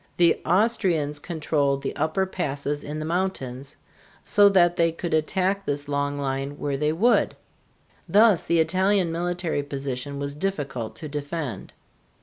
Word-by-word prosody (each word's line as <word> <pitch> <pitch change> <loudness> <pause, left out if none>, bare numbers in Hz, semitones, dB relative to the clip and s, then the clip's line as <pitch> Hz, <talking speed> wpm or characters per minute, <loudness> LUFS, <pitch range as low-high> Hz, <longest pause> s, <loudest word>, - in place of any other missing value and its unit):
The 170 -1 +4
Austrians 180 -7 +2
controlled 145 -4 -1
the - - -3
upper 160 +5 0
passes 145 -5 -3
in 150 +1 -5
the 155 - -4
mountains, 150 -6 -3 0.5
so 205 -1 +5
that 175 -3 +4
they 165 -1 +3
could 165 0 -4
attack 185 +5 +1
this 145 -3 -3
long 145 0 -1
line 135 +1 -3
where 145 -1 -2
they 150 +2 +1
would. 220 +10 +2 0.7
Thus 210 -3 +5
the 170 - +1
Italian 185 +1 +2
military 175 -2 -1
position 140 -1 -4
was 140 0 -3
difficult 145 - -3
to 155 - -7
defend. 145 -2 -5
155 Hz, 140 wpm, -25 LUFS, 145-180 Hz, 0.7 s, so